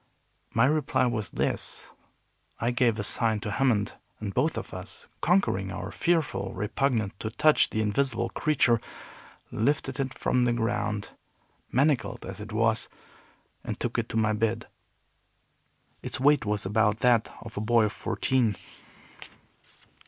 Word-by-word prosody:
My 115 +2 +4
reply 135 -3 +2
was 115 -4 -1
this. - - -2 0.7
I 120 +2 +1
gave 120 -2 +2
a 105 - -2
sign 110 +1 +1
to 105 - -3
Hammond, 110 -2 +1 0.3
and 105 -2 -4
both 150 +6 +1
of - - -6
us - - -7 0.2
conquering 145 - +2
our 95 - -5
fearful 160 - 0
repugnance 110 -1 0
to 110 - -3
touch 150 +7 +4
the 110 - -1
invisible 120 +4 0
creature 130 -7 +2 0.7
lifted 135 +2 0
it 135 -1 -2
from 125 -1 +2
the 120 - +2
ground, 105 -3 -1 0.6
manacled 130 -5 +1
as - - -7
it 110 +1 -8
was, 110 0 +1 0.7
and - - -5
took - - -1
it - - -3
to - - -2
my 110 -1 +2
bed. 115 +2 0 1.4
Its - - -4
weight 145 -1 +4
was 105 -1 -1
about 105 +2 +2
that 120 -3 +3
of 115 -1 -10
a 105 - -2
boy 115 +1 +4
of 105 - -2
fourteen. 125 -6 0
115 Hz, 145 wpm, -27 LUFS, 105-130 Hz, 1.4 s, My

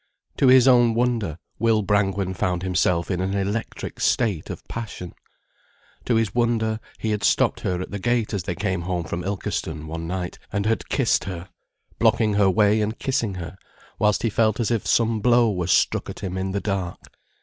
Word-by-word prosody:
To 135 - +4
his 130 0 +7
own 120 -3 +5
wonder, 115 -9 0 0.2
Will 110 -1 +2
Brangwen 100 -2 +1
found 90 -1 -1
himself 90 -1 +1
in 90 -1 -1
an 95 +1 -1
electric 100 +3 -3
state 105 -10 +1
of - - -8
passion. 105 -6 -6 0.9
To 120 - +1
his 110 -4 +1
wonder, 115 -2 +1 0.2
he 110 - -2
had 105 -1 -2
stopped - - +2
her 90 -2 -2
at 90 - -6
the 100 - -4
gate 120 +1 0
as 100 - -1
they 85 - -2
came 95 -1 -2
home 90 0 -2
from 85 +2 -4
Ilkeston 85 -5 -3
one 80 +1 -5
night, 90 0 -4
and 100 -1 -1
had 115 +1 -1
kissed 135 -4 +1
her, 90 -1 -6 0.5
blocking 110 -2 +3
her 100 -1 +4
way 105 +2 +3
and 110 +2 -2
kissing 120 -7 -1
her 85 0 -7 0.4
whilst 105 -1 +2
he 115 - +1
felt 110 0 +2
as 120 0 0
if 115 -3 -1
some 115 -1 +2
blow 120 0 +4
were 90 -3 -2
struck - - +2
at - - -8
him 95 -1 -4
in 95 0 -2
the 100 +1 -2
dark. 95 -4 -3
100 Hz, 195 wpm, -23 LUFS, 90-115 Hz, 0.9 s, his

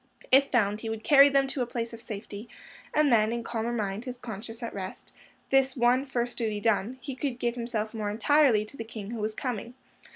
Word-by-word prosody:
If 275 +2 +6
found, 210 -3 +1
he 225 - -4
would 220 0 -4
carry 280 +3 +7
them 275 -1 +3
to 270 - -2
a 245 - 0
place 235 -1 -4
of 230 - -8
safety, 210 +1 -7 0.4
and 300 -4 +3
then, 215 -1 +4
in 235 0 -3
calmer 230 0 -2
mind, 210 -1 -3
his 250 -1 -5
conscience 225 0 -7
at 230 - -4
rest, 190 -1 -7 0.4
this 270 0 +3
one 250 +3 +3
first 245 -2 -2
duty 215 -3 -1
done, 225 +3 0
he 265 +3 -5
could 255 -1 -3
give 240 -1 -1
himself 235 -2 -3
more 215 -2 -2
entirely 235 0 +3
to 215 - -10
the 230 - -5
King 220 -2 -8
Who 235 - -4
Was 215 0 -2
Coming. 245 -1 -4
235 Hz, 220 wpm, -28 LUFS, 215-255 Hz, 0.4 s, carry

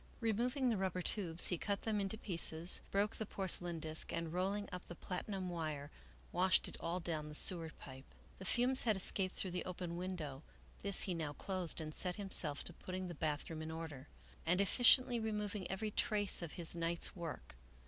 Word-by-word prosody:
Removing 245 +3 +1
the 220 - 0
rubber 185 -1 -1
tubes, 170 -3 +2
he 180 - -1
cut 200 -1 -2
them 215 -2 0
into 195 +2 -2
pieces, 170 -4 +2
broke 205 +2 0
the 220 - -3
porcelain 175 -4 -1
disk, 155 0 -4
and, 165 -1 -3
rolling 195 +3 -1
up 180 -1 -7
the 175 - -7
platinum 185 +2 -4
wire, 155 -3 -4 0.4
washed 185 +1 +3
it - - -7
all 170 +2 -2
down 155 -3 -3
the 150 - -8
sewer 165 -1 +1
pipe. 135 -3 -12 0.2
The 190 - -7
fumes 250 +6 +4
had 220 -4 +2
escaped 190 0 +6
through 185 - -2
the 180 - -2
open 180 -1 -4
window; 170 -7 -5 0.4
this 200 -1 +4
he 190 - -1
now 155 -3 -3
closed 185 -1 -2
and 155 -1 -5
set 180 +2 +1
himself 190 -8 +3
to 175 - -6
putting 185 +1 -5
the - - -5
bathroom 155 0 -3
in 160 - -5
order, 160 -4 -7 0.4
and 175 +3 +2
effectually 245 +4 +5
removing 210 -3 -3
every 210 +3 -2
trace 205 -2 +3
of 170 -3 -5
his 170 -1 -1
night's 170 0 -1
work. 170 - -7
180 Hz, 190 wpm, -37 LUFS, 165-200 Hz, 0.4 s, escaped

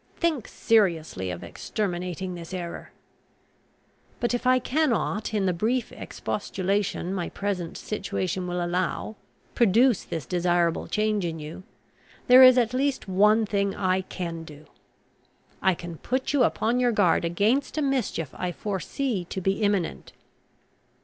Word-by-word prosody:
Think 315 - 0
seriously 170 - +1
of 90 0 -5
exterminating 180 - -3
this 170 +1 -7
error! 175 -2 -6 1.3
"But 240 -1 0
if 245 +1 -1
I 255 0 +6
cannot, 250 -6 0
in 210 -3 0
the 185 - +2
brief 230 +8 -1
expostulation 195 -2 -2
my 180 -3 -2
present 195 -4 -3
situation 190 -3 -3
will 175 0 -1
allow, 180 +4 -2 0.4
produce 235 +1 +4
this 160 -5 -5
desirable 175 0 +1
change 215 -1 0
in 165 -2 -3
you, 155 +3 -8 0.6
there 250 +1 +8
is 255 -1 +9
at 240 -1 +2
least 270 -1 0
one 210 +4 +4
thing 200 -1 0
I 185 -1 +1
can 170 -3 -5
do. 150 -1 -13 1.0
I 190 -1 +3
can 170 -1 -8
put 260 +2 -2
you 275 -4 +4
upon 235 +2 +1
your 245 -1 +3
guard 195 -8 +3
against 210 - +1
a 305 - +1
mischief 255 - -1
I 180 -1 -3
foresee 205 - -3
to 190 - -5
be 195 +3 0
imminent. 200 - -1
195 Hz, 140 wpm, -26 LUFS, 175-230 Hz, 1.3 s, is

